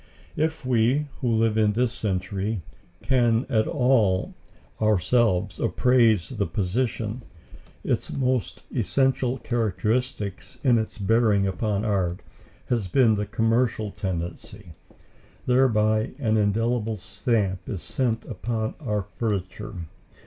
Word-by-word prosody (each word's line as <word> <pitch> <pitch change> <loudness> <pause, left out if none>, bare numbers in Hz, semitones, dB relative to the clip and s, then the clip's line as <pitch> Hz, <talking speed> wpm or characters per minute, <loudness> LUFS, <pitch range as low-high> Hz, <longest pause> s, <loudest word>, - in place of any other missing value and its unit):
If 160 -2 -1
we, 125 +4 +2
who 120 - 0
live 110 -1 +2
in 105 -1 +3
this 120 +1 +1
century, 95 0 -2 0.4
can 120 -2 +2
at 110 -3 +2
all 120 -9 +2 0.5
ourselves 105 -1 +2
appraise 115 -8 +3
the - - -2
position, 110 +5 -2 0.6
its - - -1
most 130 -4 -1
essential 130 -1 +1
characteristic 110 -3 -1 0.2
in 125 -4 +4
its 110 - -4
bearing 105 -1 +3
upon 100 +2 -1
art 95 -4 0 0.5
has 115 -6 0
been 115 +3 +4
the 105 0 -1
commercial 115 -2 +1
tendency. 90 +1 -5 0.7
Thereby 110 -4 +2
an 110 -6 +1
indelible 110 +1 +1
stamp 100 -2 -1
is 95 - -4
set 120 -3 -1
upon 110 -2 -3
our 105 -1 -2 0.2
furniture. 105 -1 -3
110 Hz, 110 wpm, -25 LUFS, 100-120 Hz, 0.7 s, in